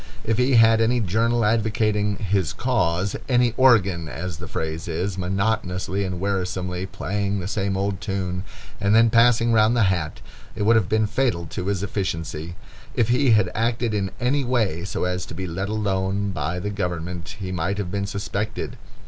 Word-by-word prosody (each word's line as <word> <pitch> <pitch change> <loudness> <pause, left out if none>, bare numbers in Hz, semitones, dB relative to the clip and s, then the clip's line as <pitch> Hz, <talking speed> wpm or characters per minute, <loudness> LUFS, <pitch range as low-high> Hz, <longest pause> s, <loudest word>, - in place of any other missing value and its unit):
If 115 +2 0
he 125 +1 +3
had 115 -1 +6
had - - +2
any 120 +2 +2
journal 115 +3 +1
advocating 105 -1 +1
"his 100 -5 0
cause," 95 -7 0
any 120 -2 +3
organ, 100 -11 +4
as 90 0 -5
the - - -7
phrase 80 +1 -4
is, 90 +4 -2
monotonously 95 0 -1
and 90 -2 -3
wearisomely 95 -1 -2
playing 100 +1 -2
the 90 - -4
same 100 -1 -1
old 100 -1 -2
tune, 95 -3 -3 0.4
and 100 +1 +3
then 115 0 +5
passing 115 0 +4
round 110 +2 +4
the 115 - +4
hat, 80 -4 -4 0.4
it - - -2
would 115 +3 +5
have 110 -6 +2
been 110 0 +2
fatal 105 -5 0
to 90 - -4
his 100 -2 -1
efficiency. 85 -4 -3 0.4
If 115 -1 +2
he 125 0 +4
had 105 -4 +3
acted 115 0 0
in 100 -2 0
any 135 +3 +1
way 110 -9 0
so - - -3
as 90 0 -1
to - - -8
be 95 +2 -4
let 95 +3 -3
alone 100 -2 -1
by 80 0 -2
the 105 +3 -3
government, 90 -3 -4
he 95 -2 -4
might 90 +2 -1
have 95 -4 -3
been 100 0 -2
suspected. 105 +1 -4
100 Hz, 180 wpm, -23 LUFS, 90-110 Hz, 0.4 s, had